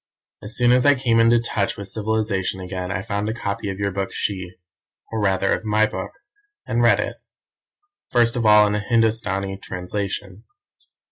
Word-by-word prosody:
"As 105 +2 +2
soon 120 0 +4
as 125 0 +4
I 145 0 +5
came 120 -3 +2
into 115 +1 +5
touch 105 -4 -2
with 100 - -7
civilization 105 -2 -2
again 90 0 -5
I 100 -1 -3
found 105 0 -2
a 110 - -3
copy 100 -2 -4
of 95 - -4
your 100 0 -1
book 95 0 -3
She, 95 -3 -4 0.6
or 110 -1 -2
rather 95 -1 +1
of - - -3
my 110 0 +2
book, - - -5 0.6
and - - 0
read - - +4
it - - -3 0.9
first 120 -1 +3
of 120 - -1
all 105 -1 +6
in 105 - 0
a 105 - 0
Hindostani 105 -3 0
translation. 95 +2 -5
105 Hz, 180 wpm, -22 LUFS, 95-115 Hz, 0.9 s, all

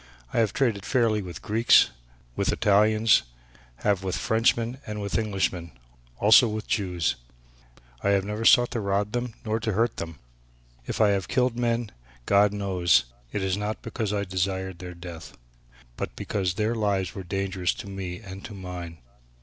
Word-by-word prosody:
I - - +2
have 110 -4 +2
traded 115 -6 0
fairly 115 -5 +2
with 90 -5 -8
Greeks, 115 +3 +5 0.4
with - - +1
Italians, 110 +1 +4 0.6
have 100 -2 +2
with 95 -1 -2
Frenchmen 115 +2 +1
and 105 0 -4
with 100 -1 -3
Englishmen, 95 - -1 0.4
also 110 +4 +7
with 110 0 -4
Jews. 90 -6 -1 0.8
I - - +1
have 100 -1 +2
never 105 +2 -3
sought 120 +1 +6
to 120 - -2
rob 100 0 0
them 120 -1 -3
nor 110 +1 0
to 110 -1 -2
hurt 115 +3 +1
them. 80 -2 -6 0.7
If - - -3
I 110 - +5
have 100 -2 0
killed 125 -1 +1
men, 120 -2 -1 0.3
God 100 0 +4
knows 95 -4 +2 0.3
it 105 - -2
was 95 -1 +1
not 105 +1 -4
because 110 -2 -3
I 100 -1 0
desired 95 -1 -2
their 90 -1 -8
death, 85 -2 -10 0.6
but - - -4
because 95 -3 -2
their 110 +2 0
lives 100 -5 0
were 100 - -6
dangerous 95 -1 -1
to - - -8
me 95 -1 -6
and 95 -2 -9
to 105 - -8
mine. 90 -3 -7
100 Hz, 165 wpm, -26 LUFS, 95-110 Hz, 0.8 s, also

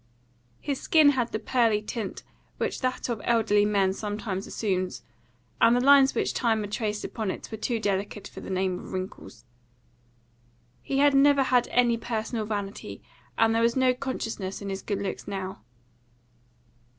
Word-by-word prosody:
His 280 -3 -3
skin 310 -3 +5
had 245 -4 -1
the - - -1
pearly 225 -1 +2
tint 210 -1 -5 0.3
which - - -2
that 255 -1 -1
of 235 -4 -3
elderly 215 -3 +3
men 200 -2 +2
sometimes 205 -2 -4
assumes, 185 -4 -2 0.6
and 230 - +6
the - - +3
lines 275 +1 +6
which - - 0
time 225 -3 +1
had 205 -1 -6
traced 210 -1 -2
upon 220 -4 -3
it - - -5
were 220 - -4
too 235 0 -1
delicate 200 0 -2
for - - -10
the - - -8
name 185 -1 -1
of - - -10
wrinkles. 185 - -7 1.4
He 270 - -2
had 285 0 +5
never 280 0 +5
had 250 -2 +2
any 240 -1 +3
personal 225 -1 -3
vanity, 205 -2 -5 0.3
and 225 0 +4
there 225 - +2
was 235 0 +2
no 260 -1 +3
consciousness 225 -7 -4
in 200 - -6
his 195 0 -4
good 200 -1 -3
looks 195 - -5
now. 190 - -5
220 Hz, 165 wpm, -27 LUFS, 200-245 Hz, 1.4 s, and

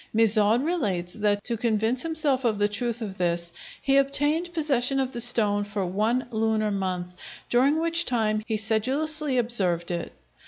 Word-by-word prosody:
Mizauld 220 +3 +3
relates 200 - -1
that 205 -1 0
to 235 - -1
convince 225 +2 0
himself 305 -5 -1
of 225 -3 +1
the 205 0 +2
truth 235 +2 -3
of 195 -3 -7
this 170 -1 -1 0.3
he 275 0 +2
obtained 290 +5 +2
possession 275 -5 +1
of 265 -1 -1
the 240 - -2
stone 215 -4 +2
for 205 -1 -3
one 215 +7 0
lunar 220 -1 0
month, 185 -2 -3 0.4
during 275 +6 +3
which 335 +1 +2
time 215 -6 0
he 220 - -1
sedulously 265 +7 -1
observed 185 -8 0
it. 170 -1 -4
225 Hz, 160 wpm, -25 LUFS, 205-270 Hz, 0.4 s, Mizauld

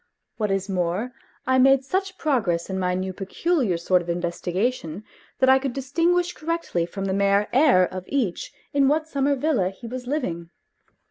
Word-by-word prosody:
What 210 -2 -1
is 195 0 -1
more, 185 +5 -1 0.3
I 260 0 +3
made 270 +1 +5
such 380 +4 -2
progress 200 - 0
in 190 - -2
my 180 -1 0
new 185 0 -3
peculiar 210 - 0
sort 180 +2 +2
of 175 - -9
investigation 175 +3 -2 0.3
that 260 - +3
I 265 0 +6
could 265 -2 -3
distinguish 340 +7 +1
correctly 315 - -2
from 195 +1 -5
the 190 - -1
mere 200 +1 +2
air 260 -8 +5
of 185 0 -7
each 240 -11 -2 0.2
in 280 -1 +4
what 310 +2 +1
summer 280 -2 +1
villa 255 -9 +1
he 195 +5 -12
was 250 +1 -6
living. 175 - -3
230 Hz, 175 wpm, -24 LUFS, 185-280 Hz, 0.3 s, I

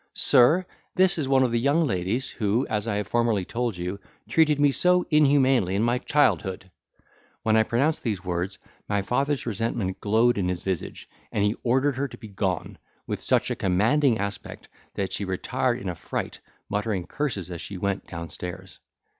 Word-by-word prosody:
Sir, 155 +10 +5 0.3
this 185 -2 +3
is 140 - -1
one 135 -1 +4
of 125 - +1
the 120 - +1
young 145 +6 +2
ladies, 105 +3 -1
who 110 +4 0
(as 105 0 -1
I 105 - 0
have 105 0 -1
formerly 115 -4 +1
told 120 -3 -2
you) 90 +3 -4 0.3
treated 155 -3 +3
me 145 -1 +5
so 180 +5 +3
humanely 135 - +4
in 105 - +1
my 120 +1 +1
childhood!" 95 -11 +1 0.7
When 110 0 +3
I 110 - +6
pronounced 135 +8 +1
these 100 -6 -3
words, 90 +2 -2 0.3
my 100 -1 0
father's 135 +5 0
resentment 115 -3 -2
glowed 110 +2 +3
in 90 -2 0
his 90 -1 -3
visage, 95 -3 -4 0.2
and 100 - 0
he 105 +2 +1
ordered 130 +2 +1
her 140 +1 0
to - - -12
be 110 - -11
gone, 95 -3 -3 0.3
with - - -4
such - - +1
a - - 0
commanding 115 +8 +2
aspect, 100 -1 -6 0.3
that 95 -1 -2
she - - -2
retired 120 +6 -1
in 110 - -6
a 90 - -1
fright, - - -5 0.3
muttering 105 -3 -2
curses 105 - -3
as 85 - -6
she 100 - -6
went 100 +1 -2
downstairs. 85 +1 -7
110 Hz, 180 wpm, -25 LUFS, 95-130 Hz, 0.7 s, I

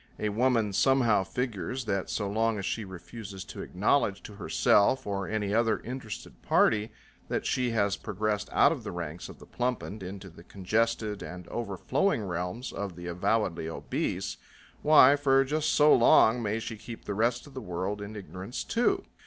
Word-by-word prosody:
A 105 - -1
woman 115 -1 +1
somehow 120 -2 +3
figures 125 +4 -3
that 100 -3 -1
so 105 - -2
long 110 +2 +1
as 100 - -4
she 110 - -2
refuses 95 +1 -9
to - - -8
acknowledge 100 0 +1
to 105 - -9
herself 100 +3 +2
or 100 -1 -2
any 105 -2 -1
other 115 0 +2
interested 125 -3 -7
party 110 0 +2 0.4
that - - -2
she 125 -1 +1
has 100 -3 +1
progressed 105 0 -2
out - - +5
of - - -4
the - - -5
ranks 85 -1 -6
of - - -11
the - - -14
plumpened 120 -4 -3
into 95 0 -8
the 85 - -15
congested 110 +2 -1
and 90 -1 -8
overflowing 115 - -1
realms 90 +7 -4
of 100 -3 -4
the 85 0 -9
avowedly 90 -1 0
obese, - - -3 0.4
why, 145 -2 +7
for 135 -2 +3
just 155 +3 0
so 150 0 +6
long 120 0 +5
may 105 0 -1
she 115 0 -5
keep 115 +2 -10
the 105 - -3
rest 115 +4 0
of 145 - -14
the 130 - -6
world 95 +1 -3
in 105 +1 -7
ignorance 95 +3 -6
too. 380 +12 +1
105 Hz, 175 wpm, -29 LUFS, 95-120 Hz, 0.4 s, why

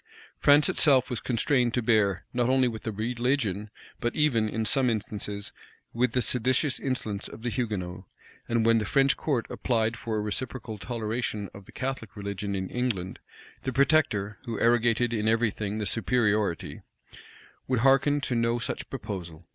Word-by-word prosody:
France 145 +1 +6
itself 130 -2 +3
was 120 - -1
constrained 125 0 +1
to 125 - +1
bear, 105 -5 +2
not 120 0 +1
only 130 -1 +4
with 110 -2 -4
the 110 - -3
religion, 115 -1 -1 0.3
but 120 - -1
even, 125 -8 +2
in 110 +1 -2
some 125 +4 +2
instances, 105 -2 -4 0.4
with 120 0 +1
the 125 - +2
seditious 130 +4 +1
insolence 110 -6 -2
of 110 - -11
the 120 - -1
Hugonots; 95 -7 -3 0.4
and 115 -1 +2
when 115 0 +5
the 105 - -2
French 135 +6 +3
court 135 -7 -1
applied 115 -2 0
for 115 -1 -4
a - - 0
reciprocal 110 0 -4
toleration 110 -2 -3
of 100 0 -12
the - - -12
Catholic 130 -5 -4
religion 100 -1 -4
in 95 -1 -2
England, 115 -8 -2 0.4
the 130 - -2
protector, 130 - +2
who 115 -4 -4
arrogated 120 0 +3
in 110 -1 0
every 115 0 +3
thing 105 0 -4
the 105 - -2
superiority, 105 -3 0 0.9
would 125 -3 +1
hearken 135 +2 +4
to 135 - -2
no 115 0 +1
such 120 - -4
proposal. 90 -10 -6
115 Hz, 165 wpm, -27 LUFS, 105-125 Hz, 0.9 s, France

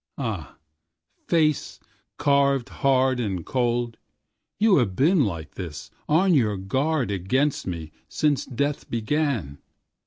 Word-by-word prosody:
Ah - - -4 0.7
face, 155 -4 +1 0.4
carved 140 -2 +2
hard 130 -1 +2
and 95 -7 -2
cold, 120 -2 -1 0.6
You 210 -3 +4
have 110 -9 +1
been 160 - +4
like 85 -6 -5
this, 85 -6 -7 0.2
on 180 +5 +4
your 110 -9 +2
guardAgainst 130 - 0
me, 80 -4 -5 0.2
since 150 -3 +1
death 140 +3 -2
began. 115 - -1
130 Hz, 105 wpm, -24 LUFS, 100-145 Hz, 0.7 s, You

